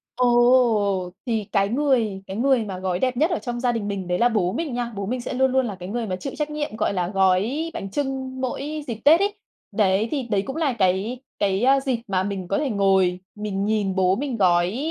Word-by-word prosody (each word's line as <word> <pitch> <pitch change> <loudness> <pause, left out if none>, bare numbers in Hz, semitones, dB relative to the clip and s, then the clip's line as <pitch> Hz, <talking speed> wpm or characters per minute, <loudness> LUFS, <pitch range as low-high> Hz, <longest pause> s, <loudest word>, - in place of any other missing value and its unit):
Ồ! 240 -6 +3
Thì 225 -3 -1
cái 200 -1 +2
người 235 -7 +1
cái 190 +2 -5
người 260 -1 +3
mà 190 -3 -6
gói 185 -1 -2
đẹp 255 -1 0
nhất 315 +6 +2
ở 345 - 0
trong 240 -1 -4
gia 245 -1 +1
đình 220 -3 -3
mình 195 -3 -4
đấy 180 0 0
là 240 +1 +4
bố 190 -5 0
mình 310 -5 -3
nha. 240 -1 -2
Bố 200 0 -3
mình 245 +3 -2
sẽ - - -5
luôn 265 +1 +2
luôn 260 0 +2
là 210 -4 -4
cái 180 0 -8
người 230 +1 -3
mà 185 - -2
chịu 265 +9 -6
trách 300 -1 -2
nhiệm, 295 -6 -4
gọi 215 -2 0
là, 180 -2 -1
gói 195 - +1
bánh 195 - -5
chưng 265 -1 -3
mỗi 290 +4 -3
dịp 235 - -3
Tết 320 +4 +7
ấy. 405 +1 +1 0.4
Đấy, 205 +1 +2
thì 280 -4 -1
đấy 205 -4 0
cũng 270 +6 -6
là 305 -6 0
cái 195 +4 0 0.2
cái, 195 +1 +1
ơ, 270 +2 +5
dịp 260 -4 -1
mà 190 -1 0
mình 195 -3 -4
có 195 - 0
thể 290 -3 -1
ngồi 190 -3 +2 0.2
mình 205 -2 -3
nhìn 205 -3 0
bố 185 0 +3
mình 255 0 -3
gói 180 0 +3
225 Hz, 240 wpm, -23 LUFS, 195-260 Hz, 0.4 s, Tết